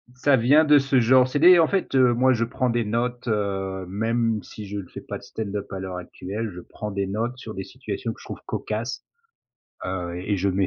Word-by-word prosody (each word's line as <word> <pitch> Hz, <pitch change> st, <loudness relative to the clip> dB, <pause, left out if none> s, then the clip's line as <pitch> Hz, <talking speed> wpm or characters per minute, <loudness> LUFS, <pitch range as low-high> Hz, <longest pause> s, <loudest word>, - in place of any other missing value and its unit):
ça 135 Hz, +2 st, +4 dB
vient 140 Hz, +7 st, +5 dB
de 150 Hz, -1 st, +7 dB
ce 135 Hz, -1 st, +2 dB
genre 125 Hz, +2 st, +5 dB
c'est 145 Hz, -, -1 dB
des 175 Hz, +3 st, +8 dB
en 165 Hz, -, +5 dB
fait, 190 Hz, -6 st, -1 dB
heu, 125 Hz, -2 st, +5 dB
moi 130 Hz, +2 st, +4 dB
je 115 Hz, -1 st, 0 dB
prends 125 Hz, +1 st, -1 dB
des 120 Hz, 0 st, +1 dB
notes, 120 Hz, +3 st, -2 dB
heu, 95 Hz, -3 st, -1 dB
même 115 Hz, +3 st, 0 dB
si 105 Hz, -, -9 dB
je 100 Hz, +1 st, -5 dB
le 95 Hz, -, -8 dB
fais -, -, -8 dB
pas -, -, -6 dB
de -, -, -16 dB
stand-up 105 Hz, -2 st, -5 dB
à 95 Hz, -, -4 dB
l'heure 95 Hz, -1 st, -5 dB
actuelle. 100 Hz, +5 st, -5 dB
Je -, -, -7 dB
prends 105 Hz, +4 st, -7 dB
des 100 Hz, 0 st, -2 dB
notes 115 Hz, +6 st, -2 dB
sur 115 Hz, -3 st, -8 dB
des 95 Hz, -, -4 dB
situations 115 Hz, 0 st, -5 dB
que -, -, -18 dB
je -, -, -13 dB
trouve -, -, -7 dB
cocasses, 110 Hz, +4 st, -4 dB, 0.8 s
heu, 90 Hz, -2 st, -3 dB
et 100 Hz, +2 st, -1 dB
je 100 Hz, +1 st, +1 dB
mets 95 Hz, +1 st, +1 dB
115 Hz, 235 wpm, -24 LUFS, 100-125 Hz, 0.8 s, des